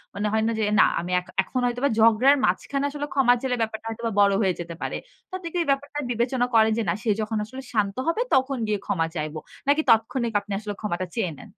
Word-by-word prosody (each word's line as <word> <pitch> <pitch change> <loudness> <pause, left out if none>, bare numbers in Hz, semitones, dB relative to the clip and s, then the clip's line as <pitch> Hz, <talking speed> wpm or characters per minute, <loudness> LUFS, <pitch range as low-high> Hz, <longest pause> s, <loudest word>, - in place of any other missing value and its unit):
মানে 210 +1 -1
হয় 220 0 +2
না 230 - +1
যে, - - +1 0.2
"না - - +8
আমি 175 +2 -5
এখ 180 - -13 0.2
এখন 255 - -3
হয়তোবা 245 +3 0
ঝগড়ার 230 +6 +6
মাঝখানে 275 +10 -1
আসলে 290 0 -4
ক্ষমা 260 -3 +5
চাইলে 260 -2 0
ব্যাপারটা 220 0 -3
হয়তোবা 230 0 -3
বড় 200 -1 +5
হয়ে 190 -3 +2
যেতে 170 -1 -6
পারে।" - - -3 0.3
তো - - -64
আপনি 365 - -8
কি - - -2
এই - - -10
ব্যাপারটা 285 +1 -2
বিবেচনা 245 +1 +1
করেন 220 0 +5
যে, 230 - 0
"না - - +2
সে 225 - -1
যখন 215 0 -2
আসলে 260 +4 -9
শান্ত 200 -2 0
হবে, 385 +8 +1
তখন 265 0 +1
গিয়ে 210 -2 0
ক্ষমা 165 -3 0
চাইবো।" 155 0 -3 0.3
নাকি 290 +2 +4
তাৎক্ষণিক 230 +1 +2
আপনি 205 - -12
আসলে 210 -1 -5
ক্ষমাটা 185 -3 -2
চেয়ে 190 -8 -1
নেন? - - -12
225 Hz, 235 wpm, -24 LUFS, 205-265 Hz, 0.3 s, না